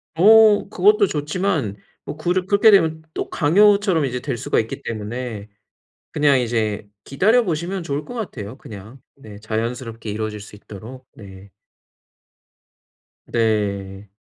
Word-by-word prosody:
어 215 +3 +6
그것도 205 +1 +3
좋지만 150 - -2 0.3
뭐 150 - -7
그렇 180 +3 -1
그렇게 205 +2 +5
되면 160 -5 +3
또 - - -4
강요처럼 195 0 +3
이제 125 -1 -3
될 130 -3 -4
수가 - - 0
있기 110 - -4
때문에 110 -1 -6 0.7
그냥 145 -3 +3
이제 110 -3 -2 0.2
기다려 220 - +2
보시면 175 +2 -3
좋을 145 -1 -4
것 245 - -10
같아요 130 - -6
그냥. 110 +5 -11 0.2
네 105 -6 -13
자연스럽게 115 +1 -5
이루어질 105 0 -4
수 105 0 -12
있도록. 115 +6 -12
네. 95 -2 -13 1.8
네. 100 -3 -2
130 Hz, 270 characters per minute, -21 LUFS, 110-180 Hz, 1.8 s, 어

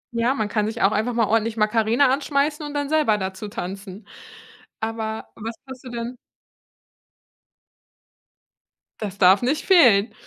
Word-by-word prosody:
Ja, 235 +3 +1
man 215 -5 -1
kann 210 0 -1
sich 225 0 -3
auch 195 - +4
einfach 220 +3 -1
mal 230 -1 +2
ordentlich 225 +1 0
„Macarena“ 225 +5 +2
anschmeißen 290 +2 -1
und 295 0 -7
dann 285 -1 -1
selber 300 -8 +2
dazu 190 +1 -5
tanzen. 200 -1 -7 0.7
Aber 220 0 -4
was 225 +1 -6
hast 260 -1 -10
du - - -7
denn 235 +1 -5 2.8
Das 200 -3 -5
darf 190 +1 +5
nicht 265 +5 -1
fehlen 245 - +5
225 Hz, 140 wpm, -22 LUFS, 210-255 Hz, 2.8 s, darf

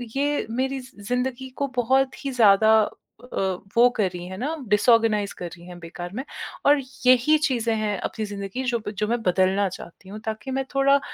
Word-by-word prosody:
ये 290 +1 0
मेरी 265 +3 -1
ज़ि 255 -5 -14
ज़िंदगी 250 +1 -2
को 280 - 0
बहुत 265 +3 +1
ही 275 - -1
ज़्यादा 220 -2 +5 0.4
अ, - - -11 0.5
वो 245 +1 +7
करी 180 -4 -1
हैं 185 +1 -7
ना, 295 +7 -2
डिसऑर्गनाइज़ 210 -1 +3
करी 175 -1 -8
हैं 180 -1 -9
बेकार 175 +1 -8
में, 260 - -3 0.4
और 290 +1 +6 0.3
यही 255 +5 +5
चीज़ें 235 -4 0
हैं 215 -2 -1
अपनी 220 - -4
ज़िंदगी, 200 +4 -5
जो 240 -2 0
ब - - -1
जो 210 - 0
मैं 235 +1 0
बदलना 190 +1 +2
चाहती 180 +2 -11
हूँ, 210 +2 -7
ताकि 220 +4 -4
मैं 270 0 -1
थोड़ा 275 +1 +4
230 Hz, 185 wpm, -24 LUFS, 200-265 Hz, 0.5 s, वो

